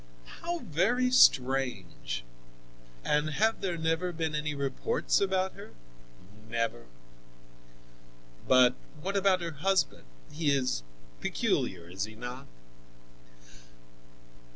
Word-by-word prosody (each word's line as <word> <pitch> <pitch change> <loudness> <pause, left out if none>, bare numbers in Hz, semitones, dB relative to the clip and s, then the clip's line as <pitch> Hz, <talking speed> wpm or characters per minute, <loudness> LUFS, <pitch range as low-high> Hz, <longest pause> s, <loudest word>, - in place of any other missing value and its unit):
"How 345 0 -2
very 240 +11 +1
strange! 125 - +3 0.8
And 150 +1 +2
have 220 +8 +1
there 180 -3 -1
never 165 +2 0
been 160 -2 -2
any 150 0 -2
reports 140 - 0
about 190 -1 +1
her?" - - -12 0.7
"Never." 115 - -2 1.6
"But 130 -1 +6 0.3
what 195 +6 -3
about 195 -2 +3
her 170 -1 -3
husband? 190 - 0 0.3
He 150 0 0
is 130 - +1 0.4
peculiar, 85 +6 -1
is 95 +3 -3
he 110 0 -11
not?" 125 +4 -7
150 Hz, 100 wpm, -30 LUFS, 125-190 Hz, 1.6 s, But